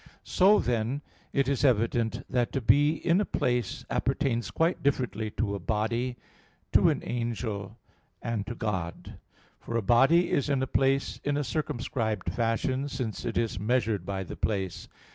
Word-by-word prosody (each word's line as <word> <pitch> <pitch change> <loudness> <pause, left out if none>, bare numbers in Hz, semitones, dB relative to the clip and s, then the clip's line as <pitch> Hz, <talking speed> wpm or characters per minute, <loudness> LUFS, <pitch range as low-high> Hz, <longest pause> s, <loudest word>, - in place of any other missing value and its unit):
So, 200 +2 +5
then, 120 +4 -1 0.3
it 140 -1 +1
is 140 -1 0
evident 115 -2 +2
that 120 -2 0
to 135 - +1
be 145 +5 +4
in 170 +4 +2
a - - +2
place 120 - -1
appertains 135 -4 0
quite 165 +2 +1
differently 125 -6 0
to 105 -3 0
a 100 - -3
body, 115 +5 -1 0.5
to - - +5
an - - -1
angel, 115 -4 -3 0.4
and 110 -3 -3
to 120 - -4
God. 95 -7 -4 0.4
For 115 - -3
a 115 - -1
body 135 - +4
is 140 0 +1
in 135 -2 +1
a - - +2
place 135 +1 +1
in 145 0 0
a 145 - 0
circumscribed 125 -6 -2
fashion, 125 +4 0
since 125 -5 -4
it - - -2
is 115 -5 0
measured 110 -3 +1
by 95 +1 -3
the - - -7
place. 95 -5 -2
120 Hz, 160 wpm, -28 LUFS, 110-135 Hz, 0.5 s, So